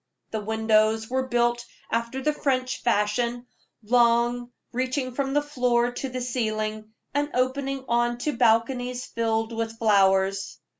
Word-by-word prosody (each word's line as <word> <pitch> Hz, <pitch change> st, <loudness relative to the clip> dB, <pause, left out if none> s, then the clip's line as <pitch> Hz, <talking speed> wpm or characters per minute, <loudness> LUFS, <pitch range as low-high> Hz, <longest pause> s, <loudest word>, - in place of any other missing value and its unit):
The 220 Hz, -, -2 dB
windows 220 Hz, +1 st, +1 dB
were 260 Hz, 0 st, 0 dB
built 240 Hz, -1 st, +1 dB, 0.3 s
after 235 Hz, +3 st, -2 dB
the 300 Hz, -, +2 dB
French 260 Hz, -3 st, -1 dB
fashion 235 Hz, +2 st, 0 dB, 0.4 s
long, 240 Hz, +1 st, +2 dB, 0.2 s
reaching 255 Hz, +1 st, -2 dB
from 270 Hz, +1 st, -2 dB
the 290 Hz, -, +3 dB
floor 245 Hz, -4 st, +1 dB
to 265 Hz, +2 st, -4 dB
the 255 Hz, 0 st, -4 dB
ceiling, 215 Hz, -3 st, -2 dB, 0.2 s
and 290 Hz, +1 st, 0 dB
opening 265 Hz, +1 st, -1 dB
on 240 Hz, 0 st, +1 dB
to 300 Hz, -, -1 dB
balconies 245 Hz, +2 st, +1 dB
filled 225 Hz, 0 st, -1 dB
with 225 Hz, 0 st, -3 dB
flowers. 195 Hz, -3 st, +2 dB
240 Hz, 135 wpm, -25 LUFS, 220-255 Hz, 0.4 s, the